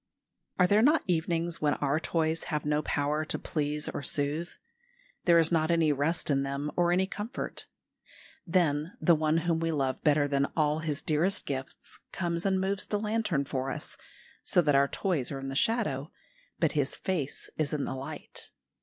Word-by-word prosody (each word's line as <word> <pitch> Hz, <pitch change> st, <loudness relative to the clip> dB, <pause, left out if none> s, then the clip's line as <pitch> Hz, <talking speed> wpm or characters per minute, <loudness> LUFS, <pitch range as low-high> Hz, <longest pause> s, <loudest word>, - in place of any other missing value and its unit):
Are 180 Hz, -, +5 dB
there 205 Hz, +4 st, +4 dB
not 300 Hz, +7 st, +4 dB
evenings 170 Hz, -1 st, 0 dB
when 150 Hz, -1 st, +2 dB
our 145 Hz, +1 st, 0 dB
toys 160 Hz, -1 st, 0 dB
have 150 Hz, -3 st, -2 dB
no 150 Hz, 0 st, +1 dB
power 150 Hz, +1 st, 0 dB
to 155 Hz, -, -3 dB
please 150 Hz, -1 st, -2 dB
or -, -, -3 dB
soothe? 145 Hz, +4 st, -1 dB, 0.8 s
There 170 Hz, -2 st, +6 dB
is 165 Hz, 0 st, +4 dB
not 160 Hz, -1 st, +2 dB
any 165 Hz, -2 st, +3 dB
rest 145 Hz, +3 st, 0 dB
in 135 Hz, -1 st, +2 dB
them 140 Hz, +2 st, -3 dB
or 175 Hz, -1 st, +3 dB
any 185 Hz, +2 st, +3 dB
comfort. 210 Hz, +6 st, -6 dB, 0.8 s
Then 165 Hz, -2 st, +1 dB
the 175 Hz, -, +5 dB
One 155 Hz, 0 st, +2 dB
whom 165 Hz, -2 st, +2 dB
we 165 Hz, 0 st, 0 dB
love 135 Hz, -4 st, -1 dB
better 150 Hz, -2 st, +4 dB
than 140 Hz, 0 st, +1 dB
all 150 Hz, 0 st, +2 dB
His 155 Hz, -2 st, -3 dB
dearest 175 Hz, +6 st, +1 dB
gifts 135 Hz, -1 st, -5 dB
comes 170 Hz, 0 st, -1 dB
and 190 Hz, -1 st, +2 dB
moves 195 Hz, +1 st, -1 dB
the 210 Hz, -, 0 dB
lantern 210 Hz, -9 st, 0 dB
for 135 Hz, -1 st, -2 dB
us, -, -, -4 dB, 0.5 s
so -, -, +2 dB
that 150 Hz, -2 st, +3 dB
our 140 Hz, 0 st, +5 dB
toys 160 Hz, -6 st, -1 dB
are 140 Hz, -, -3 dB
in 135 Hz, 0 st, -5 dB
the 135 Hz, -, -5 dB
shadow 155 Hz, -, 0 dB, 0.5 s
but -, -, +2 dB
His -, -, 0 dB
face 165 Hz, -8 st, -3 dB
is 150 Hz, -2 st, 0 dB
in 150 Hz, -2 st, -1 dB
the -, -, -3 dB
light. 140 Hz, +4 st, -8 dB
155 Hz, 185 wpm, -29 LUFS, 145-175 Hz, 0.8 s, There